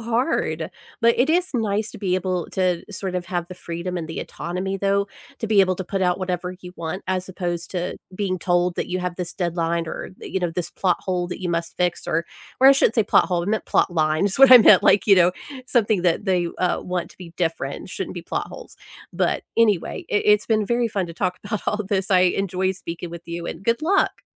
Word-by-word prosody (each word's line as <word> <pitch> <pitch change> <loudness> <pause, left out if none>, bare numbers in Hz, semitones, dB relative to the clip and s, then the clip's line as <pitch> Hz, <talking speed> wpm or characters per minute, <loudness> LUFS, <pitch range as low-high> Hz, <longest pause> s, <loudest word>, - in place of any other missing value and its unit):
hard, 235 +6 -1 0.3
but 235 0 +5
it 270 +6 +3
is 360 +2 +2
nice 215 -2 0
to - - -10
be 185 -3 0
able 185 -2 -2
to, 180 -2 0
sort 190 -2 -4
of, 180 -1 -3
have 175 -2 -2
the 185 - -8
freedom 175 +1 -5
and 165 -2 -4
the 160 - -6
autonomy 185 +3 -4
though 200 +1 +1 0.3
to 225 - -3
be 210 -2 +4
able 185 -1 +2
to 190 - -4
put 195 +1 -2
out 180 0 +2
whatever 180 -1 -3
you 180 0 -10
want 170 +3 -5
as 185 0 -2
opposed 175 -2 -4
to 180 0 -3 0.2
being 185 -1 -2
told 175 0 +1
that - - -2
you 185 0 -1
have 180 -1 -3
this 180 -2 -4
deadline 170 -1 -1
or, - - -6
you 190 - -3
know, 175 -1 0
this 170 +1 -4
plot 180 -3 +1
hole 180 -2 -2
that 180 - -6
you 180 - -3
must 170 0 -2
fix 180 -1 -1
or 165 +1 0 0.4
or 265 - +7
I - - +9
shouldn't 250 -4 +3
say 225 - +4
plot - - +4
hole. 175 -2 0
I 175 - -5
meant 215 +1 -1
plot - - +2
line 155 +2 +1
is 200 +3 -1
what 270 -1 +8
I 255 - +12
meant, 210 -4 +7
like, 205 - +4
you 200 - +7
know, 180 -1 +4 0.3
something 220 -7 +2
that 180 +3 +1
they, 180 -3 +1
uh, 180 - +1
want 180 -1 -3
to - - -19
be 170 -2 -10
different. 165 -2 -3
Shouldn't - - -5
be - - -6
plot - - -3
holes, - - -11 0.4
but - - 0
anyway, 210 -6 +1
i - - -2 0.2
it's 210 0 +1
been 215 -2 +1
very 235 +1 +1
fun 195 -4 -2
to 170 - -9
talk 180 0 -2
about 210 0 -3
all 215 0 0
this. 195 -1 -1
I 185 -1 +5
enjoy 185 0 +1
speaking 170 -2 -7
with 170 0 -8
you, 170 0 -5
and 170 - -6
good 230 +6 +1
luck. 385 +4 +1
185 Hz, 240 wpm, -22 LUFS, 175-205 Hz, 0.4 s, I